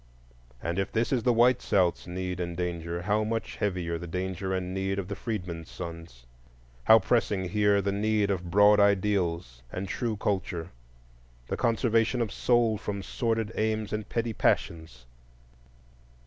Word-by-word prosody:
And 85 +3 -1
if 95 - -2
this 115 +1 0
is 125 - +2
the 125 - +3
white 120 +2 +4
South's 90 -4 +1
need 90 0 -4
and 85 -1 -4
danger, 85 -1 -3
how 105 +2 +1
much 115 +1 -3
heavier 90 -5 -2
the 90 - -7
danger 95 +2 -3
and 95 -1 -2
need 95 0 -1
of 95 -2 -3
the 100 - -3
freedmen's 90 -8 -5
sons! 85 -8 -9 0.6
how 110 - +9
pressing 105 -3 0
here 105 0 +3
the 100 - 0
need 105 0 +1
of 90 -2 -3
broad 105 +3 +6
ideals 95 -9 +1
and 95 +1 -4
true 115 +1 -2
culture, 90 -4 -2 0.8
the - - -1
conservation 115 0 +1
of 115 -4 -1
soul 120 -3 +2
from 100 -2 -4
sordid 115 0 -1
aims 110 -1 -1
and 105 0 -4
petty 115 -1 -1
passions! 80 - -1
100 Hz, 155 wpm, -28 LUFS, 90-110 Hz, 0.8 s, how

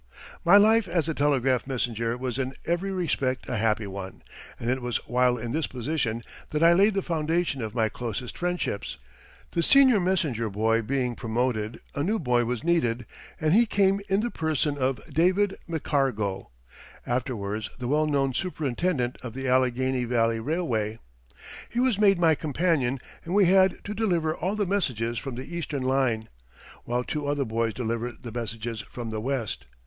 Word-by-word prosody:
] - - -17
My 185 +4 +7
life 220 +1 +5
as 170 -3 0
a 160 - 0
telegraph 135 -4 +1
messenger 115 -3 -1
was 125 0 -3
in 130 0 -2
every 175 +4 0
respect 140 -8 -1
a 125 - -2
happy 110 0 +1
one, 95 -1 -7 0.4
and 115 - -5
it 130 +1 0
was 120 -1 -1
while 125 0 +3
in 115 0 -4
this 155 +3 0
position 125 -3 -2 0.3
that 150 +1 0
I 170 +1 +7
laid 200 +4 +4
the 195 - 0
foundation 165 -3 0
of 110 0 -5
my 110 -2 +2
closest 120 +2 -5
friendships. 175 -12 -2 0.5
The 170 - +1
senior 260 +1 +6
messenger 165 - 0
boy 110 +3 +1
being 125 +1 -1
promoted, 115 -1 -2
a 140 - -2
new 205 +9 +1
boy 125 - +1
was 120 -1 -3
needed, 125 -9 +1 0.3
and 155 +1 +2
he 230 +3 +5
came 200 -1 +2
in 195 +2 +3
the 240 +1 -2
person 155 -2 0
of 130 -2 -1
David 185 +6 +3
McCargo, 135 - -1 0.6
afterwards 110 -4 -2
the 125 - -4
well 150 +3 +2
known 135 -3 +1
superintendent 145 -4 -1
of 125 -2 -7
the 135 0 -3
Allegheny 130 0 +2
Valley 115 -1 +1
Railway. 115 -7 -1 0.7
He 235 - -2
was 250 -5 +2
made 200 -3 +5
my 165 -2 +4
companion 150 -4 0 0.3
and 175 +3 -3
we 205 -2 +6
had 190 0 +5
to 205 - -4
deliver 175 -8 +1
all 185 +5 -2
the 210 -1 0
messages 120 - -1
from 135 +1 -6
the 135 +7 -7
Eastern 150 -5 -3
line, 130 -4 +1 0.6
while 120 +1 -1
two 150 +2 -3
other 145 -1 0
boys 115 -1 -1
delivered 115 0 -3
the 120 - -6
messages 115 -1 -4
from 115 +1 -7
the 110 -1 -3
West. 115 - -3
130 Hz, 175 wpm, -26 LUFS, 115-170 Hz, 0.7 s, My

